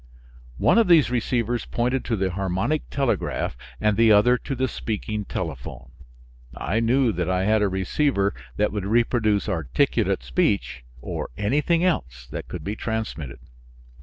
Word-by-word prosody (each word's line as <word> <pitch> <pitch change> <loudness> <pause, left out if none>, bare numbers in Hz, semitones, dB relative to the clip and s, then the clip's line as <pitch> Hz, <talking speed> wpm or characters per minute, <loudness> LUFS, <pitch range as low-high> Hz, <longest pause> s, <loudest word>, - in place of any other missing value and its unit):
One - - +4
of 225 - +3
these 160 -8 +5
receivers 120 -1 0
pointed 125 +2 -1
to 115 - 0
the 95 -2 -1
harmonic 95 - -1
telegraph 135 - -1 0.2
and 105 -1 +2
the 115 +1 +5
other 105 +4 +6
to 135 - -4
the 130 +1 0
speaking 105 -3 -4
telephone. 75 -11 -6 0.7
I 110 - -1
knew 120 +1 +3
that 90 -3 -2
I 95 0 +1
had 110 +1 +3
a 105 - +2
receiver 100 +3 0 0.2
that 105 - +2
would 105 -2 -3
reproduce 110 -2 +2
articulate 80 - 0
speech 60 -1 0 0.2
or - - -4
anything 150 +10 +1
else 65 - -1
that - - -6
could - - -7
be 100 +2 -3
transmitted. 110 - -4
110 Hz, 150 wpm, -24 LUFS, 95-125 Hz, 0.7 s, other